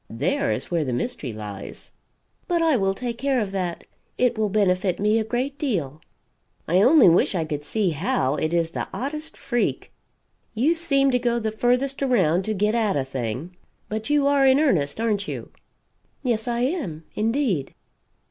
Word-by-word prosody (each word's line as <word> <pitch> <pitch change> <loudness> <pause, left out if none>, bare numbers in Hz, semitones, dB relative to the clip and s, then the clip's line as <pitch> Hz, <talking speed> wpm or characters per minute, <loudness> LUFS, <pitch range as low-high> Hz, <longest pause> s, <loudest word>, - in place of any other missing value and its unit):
There 230 - 0
is - - -3
where 170 -2 +1
the 130 -4 -3
mystery 130 - -3
lies." 105 -2 -9 0.6
"But 345 -2 +1
I 320 -3 +3
will 195 -4 +1
take 240 +1 -4
care 275 -1 +1
of 205 -4 -2
that. 180 -3 -3 0.3
It 245 -1 +2
will 215 -1 0
benefit 185 -3 +1
me 210 +2 +2
a - - 0
great 255 +5 -3
deal." 160 - -2 0.7
"I 180 +4 +3
only 270 +1 +7
wish 175 +3 +4
I 165 -3 0
could 150 -2 -4
see 195 +3 0
how; 145 -4 0
it 155 +1 -1
is 170 -1 0
the - - -4
oddest 305 +4 -5
freak. 240 -2 -2 0.6
You 270 +9 +3
seem 275 -5 +2
to 250 - +2
go 240 -1 0
the 220 -2 -2
furthest 250 +5 0
around 190 - +2
to 215 - -1
get 210 +2 +1
at 220 -4 +1
a 135 -2 0
thing 130 +6 -5 0.3
but 220 +4 -4
you 295 -1 +3
are 280 -1 +4
in 265 +1 +5
earnest, 185 - +1
aren't 210 -3 0
you?" - - -6 0.7
"Yes 235 -3 -1
I 240 0 -1
am, 245 - -2
indeed." 220 - -1
215 Hz, 180 wpm, -24 LUFS, 170-260 Hz, 0.7 s, only